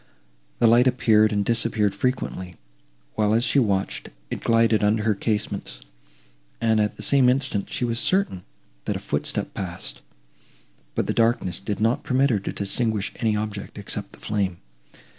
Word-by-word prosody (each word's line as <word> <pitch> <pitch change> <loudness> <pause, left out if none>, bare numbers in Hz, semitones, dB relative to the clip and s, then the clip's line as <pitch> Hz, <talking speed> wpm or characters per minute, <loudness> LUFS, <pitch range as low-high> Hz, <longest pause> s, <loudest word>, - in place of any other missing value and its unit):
The 120 - +3
light 120 +3 +6
appeared 110 -4 +4
and 100 -1 0
disappeared 110 -3 +1
frequently, 100 -6 -3 0.6
while, 105 0 +2
as 115 - +2
she 140 - +3
watched, 100 -5 -1 0.2
it - - -4
glided 115 -2 +3
under 105 +1 +2
her 110 0 +2
casements, 105 - -3 0.8
and, 110 -1 +2
at 105 - -1
the - - -7
same 135 -3 +4
instant, 130 -6 0
she 125 - -1
was 115 -1 0
certain, 185 - +1 0.4
that - - -1
a - - -3
footstep - - -2
passed, 90 -3 -4 0.9
but - - 0
the - - -1
darkness 115 -7 +1
did 100 +1 -4
not 115 +3 +1
permit 135 +2 +2
her 105 - +1
to 95 - -5
distinguish 105 +1 -1
any 110 -3 +1
object 105 -1 -5
except 100 0 -3
the - - -15
flame. 100 -4 -2
110 Hz, 160 wpm, -24 LUFS, 100-120 Hz, 0.9 s, light